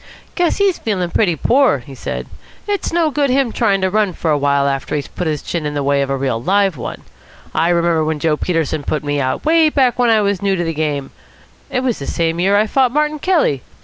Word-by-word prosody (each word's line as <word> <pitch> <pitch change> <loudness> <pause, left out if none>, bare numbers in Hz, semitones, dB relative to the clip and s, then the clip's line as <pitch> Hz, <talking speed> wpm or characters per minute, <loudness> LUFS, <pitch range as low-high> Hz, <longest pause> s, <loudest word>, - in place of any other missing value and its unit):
"Guess 350 -2 +1
he's 400 -3 +1
feeling 185 -6 -2
pretty 180 -6 +2
poor," 250 - +3
he 130 +2 -12
said. 130 - -5 0.4
"It's 405 -1 -1
no 330 -2 +1
good 285 -1 +1
him 260 -2 +1
trying 200 -5 +1
to 190 - +1
run 210 -2 +1
for 160 - -1
a 150 - +3
while 140 0 +2
after 135 +1 -2
he's 145 - -3
put 180 - -4
his 150 -2 -2
chin 170 -2 -3
in 150 0 -3
the 145 - -1
way 140 0 +2
of 135 - -2
a 135 - 0
real 130 -4 -1
live 195 +3 +2
one. 125 - -7 0.5
I 165 +2 +1
remember 170 -2 +2
when 155 0 -1
Joe 155 0 +1
Peterson 160 -2 -1
put 150 +1 -3
me 145 -1 -1
out, 130 0 -2
way 320 0 +4
back 260 -5 +1
when 245 -1 +3
I 220 -1 +4
was 200 -2 0
new 200 -1 +1
to 175 - -1
the 165 -1 -2
game 145 -3 -2 0.6
it 255 -2 -1
was 255 -3 -1
the 140 - -6
same 165 0 -1
year 195 +3 +3
I 210 - +3
fought 255 +2 +2
Martin 300 +2 0
Kelly. 310 - +1
175 Hz, 245 wpm, -17 LUFS, -, 0.6 s, way